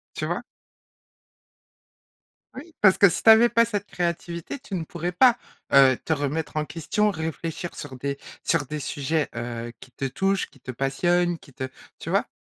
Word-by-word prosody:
tu - - -2
vois? - - -2 2.1
Oui, 310 +5 -10
parce 190 -2 +6
que 200 - +7
si - - -3
tu - - +3
avais 230 +2 +7
pas 230 0 +5
cette 205 -3 -3
créativité, 170 - -3
tu 270 -7 -8
ne 170 -3 -2
pourrais 175 +2 -4
pas, 245 +6 +5 0.4
heu, 135 -2 +7
te 160 - -2
remettre 150 +2 -3
en 155 - +1
question, 190 +7 0
réfléchir 165 +1 -4
sur 135 -3 -8
des 140 +2 -3 0.2
sur - - +1
des 150 +3 -5
sujets, 145 +2 -1
heu, 120 0 -4
qui 125 - -13
te 135 - -3
touchent, 195 +8 0
qui - - -22
te 130 - -7
passionnent, 175 +7 +1
qui 140 - -18
te 130 - -5 0.3
tu - - -8
vois? - - +1
165 Hz, 180 wpm, -25 LUFS, 140-195 Hz, 2.1 s, que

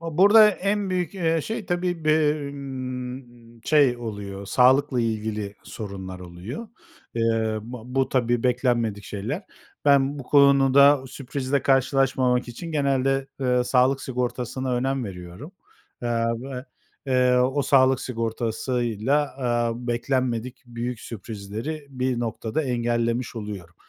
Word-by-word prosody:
Burada 200 +7 +6
en 200 0 -1
büyük, 180 -2 -1
eee, 165 -3 +1
şey 220 +2 -5
tabii, 175 -2 -2
be 155 -2 +2
ımm, 125 -3 -7
şey 145 -5 +4
oluyor, 100 -4 -6
sağlıkla 130 +3 +4
ilgili 110 -2 -2
sorunlar 95 -4 -7
oluyor. 90 - -8 0.5
Eee, 115 -1 +1
ba 120 0 -8
bu 130 +1 0
tabii, 120 -2 +1
beklenmedik 120 -5 0
şeyler. 120 - -4 0.4
Ben 140 0 +4
bu - - -5
konuda 140 0 +5
sürprizle 135 +1 -3
karşılaşmamak 130 -2 +2
için 165 +7 -7
genelde, 135 -2 +1
eee, 125 -1 +2
sağlık 130 +2 +3
sigortasına 125 0 -2
önem 130 0 -1
veriyorum, 90 - -9 0.5
eee, 120 - -1 0.3
ve, 130 -1 -6 0.4
eee, 125 -1 +3
o 130 +3 +2
sağlık 130 -1 +4
sigortasıyla, 120 +3 -1
eee, 120 -1 -1
beklenmedik 125 0 -1
büyük 120 0 -5
sürprizleri 115 +7 -6
bir 130 -2 -1
noktada 115 +4 -2
engellemiş 120 -1 -1
oluyorum. 100 -6 -7
125 Hz, 115 wpm, -24 LUFS, 115-140 Hz, 0.5 s, Burada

